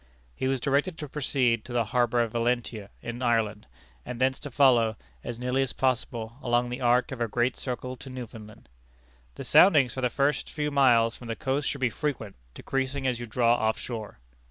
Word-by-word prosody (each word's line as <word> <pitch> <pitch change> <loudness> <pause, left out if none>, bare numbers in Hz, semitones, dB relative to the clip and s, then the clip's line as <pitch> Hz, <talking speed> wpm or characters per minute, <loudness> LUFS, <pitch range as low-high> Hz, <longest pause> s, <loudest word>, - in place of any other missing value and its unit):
He 130 - -2
was 135 0 0
directed 140 +7 0
to 150 - -6
proceed 130 -5 0
to 125 - -8
the 120 -2 +1
harbor 120 -1 +3
of 115 - -4
Valentia 115 -3 -1
in 120 +1 -5
Ireland, 110 -4 0 0.4
and 125 - -7
thence 130 +1 +1
to 145 - -7
follow, 120 -5 +4 0.3
as 120 - -5
nearly 125 +2 0
as 135 - -1
possible, 120 -2 -2
along 120 0 +1
the 125 +2 -5
arc 125 +1 +3
of 130 -3 -6
a 115 - +1
great 120 +3 0
circle 125 0 -4
to 135 +2 -10
Newfoundland. 115 -3 -10 0.7
"The - - -7
soundings 145 -10 +6
for 130 - -4
the 125 - +2
first 140 +4 0
few 150 -1 -2
miles 120 -5 +4
from 120 - -11
the 115 - -3
coast 135 +3 -1
should 140 - -5
be 125 -2 +2
frequent, 115 -8 -3 0.2
decreasing 135 0 -2
as 125 -2 0
you 120 - -6
draw 120 +1 +3
off 110 -2 +1
shore." 110 -4 -6
125 Hz, 200 wpm, -27 LUFS, 115-135 Hz, 0.7 s, soundings